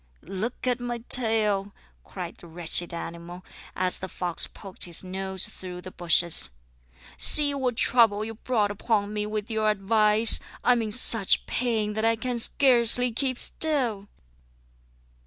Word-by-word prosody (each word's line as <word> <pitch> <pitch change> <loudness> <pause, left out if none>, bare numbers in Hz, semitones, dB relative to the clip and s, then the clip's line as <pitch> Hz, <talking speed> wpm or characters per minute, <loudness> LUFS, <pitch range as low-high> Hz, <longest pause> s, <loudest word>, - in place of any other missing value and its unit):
"Look 220 +7 -6
at 250 -1 0
my 240 -1 -5
tail," 210 -4 +2 0.3
cried - - -8
the 175 - -14
wretched 170 +1 -1
animal, 170 +1 -8 0.3
as 185 0 +2
the 190 - -6
fox 175 -1 -1
poked 195 -3 -8
his 175 0 -2
nose 190 0 -2
through 180 -1 -10
the 185 - -10
bushes. 170 - +3 0.7
"See 290 -2 +5
what 255 -4 -2
trouble 220 -4 +3
you 225 - -7
brought 215 -2 -1
upon 205 0 -2
me 210 0 -3
with 215 +1 -5
your 220 -1 0
advice! 215 +2 +3 0.2
I - - +3
am 240 -1 +2
in 215 -1 -4
such 225 -3 +3
pain 220 -4 -2
that 220 +1 -3
I 225 0 +2
can 245 +1 -4
scarcely 245 -1 +2
keep 255 +2 -3
still." 245 -13 0
215 Hz, 150 wpm, -25 LUFS, 190-235 Hz, 0.7 s, See